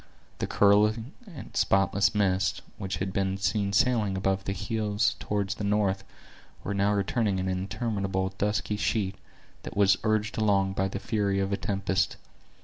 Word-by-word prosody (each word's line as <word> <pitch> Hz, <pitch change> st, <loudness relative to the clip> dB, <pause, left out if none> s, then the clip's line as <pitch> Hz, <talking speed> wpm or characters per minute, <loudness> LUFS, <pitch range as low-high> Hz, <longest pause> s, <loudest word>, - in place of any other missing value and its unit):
The -, -, -1 dB
curling 105 Hz, +4 st, +3 dB, 0.2 s
and 160 Hz, -, -10 dB
spotless 95 Hz, +1 st, +2 dB
mists, 95 Hz, -3 st, +1 dB, 0.2 s
which 95 Hz, -1 st, -3 dB
had 95 Hz, +1 st, -3 dB
been 95 Hz, 0 st, 0 dB
seen 100 Hz, 0 st, 0 dB
sailing 105 Hz, -2 st, +2 dB
above 95 Hz, 0 st, 0 dB
the -, -, -1 dB
hills 105 Hz, -1 st, 0 dB
toward 100 Hz, -2 st, -2 dB
the 100 Hz, +1 st, -3 dB
north, 100 Hz, -1 st, +1 dB, 0.6 s
were 100 Hz, -, -2 dB
now 100 Hz, +1 st, +2 dB
returning 100 Hz, 0 st, 0 dB
in 95 Hz, 0 st, -2 dB
an 95 Hz, -, 0 dB
interminable 95 Hz, -2 st, -2 dB
dusky 105 Hz, 0 st, 0 dB
sheet, 105 Hz, -2 st, 0 dB, 0.5 s
that -, -, -8 dB
was 100 Hz, -2 st, +4 dB
urged 110 Hz, 0 st, 0 dB
along 100 Hz, -3 st, +2 dB
by 95 Hz, 0 st, 0 dB
the 100 Hz, -, -5 dB
fury 100 Hz, -1 st, 0 dB
of 100 Hz, 0 st, -1 dB
a -, -, +3 dB
tempest. 95 Hz, -2 st, -1 dB
100 Hz, 160 wpm, -28 LUFS, 95-105 Hz, 0.6 s, was